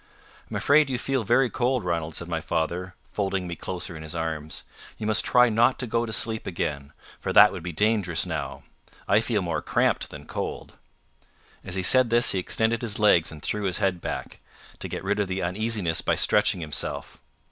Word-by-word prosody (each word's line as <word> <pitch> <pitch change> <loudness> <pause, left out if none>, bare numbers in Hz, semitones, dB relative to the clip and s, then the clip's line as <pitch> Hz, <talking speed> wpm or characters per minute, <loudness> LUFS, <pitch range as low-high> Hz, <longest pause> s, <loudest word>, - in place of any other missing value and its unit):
"I'm - - -6
afraid 145 0 +4
you 130 - -1
feel 130 0 -1
very 120 +5 +3
cold, 125 -1 0
Ranald," 85 -3 -2
said 85 - -2
my 80 -2 -2
father, 85 +3 -2 0.2
folding 95 -2 -2
me 85 -1 -5
closer 90 -1 -5
in 80 - -8
his 80 +1 -7
arms. 80 -2 -4 0.3
"You 110 - -5
must 110 0 +2
try 125 0 +5
not 115 +3 +3
to 125 - -3
go 115 0 -1
to - - -5
sleep 110 0 +1
again, 70 -5 -3 0.3
for - - -3
that 105 0 +8
would 90 - -6
be 90 +1 -5
dangerous 95 -4 +1
now. - - -5 0.4
I 100 - +4
feel 110 -3 -1
more 85 -3 -2
cramped - - 0
than - - -10
cold." - - -5 0.9
As 90 - -5
he 95 - -1
said 130 +4 +5
this, 120 +1 +5
he 95 - 0
extended 110 +5 0
his 115 -3 -1
legs 100 -6 +4
and 75 -2 -11
threw 105 -1 -2
his 95 - +1
head 95 -4 0
back, - - -5 0.4
to - - -4
get - - -5
rid 100 +2 0
of 100 - 0
the 95 0 -3
uneasiness 95 -2 0
by - - +1
stretching 105 -3 +2
himself. 75 -2 -4
100 Hz, 200 wpm, -25 LUFS, 85-115 Hz, 0.9 s, that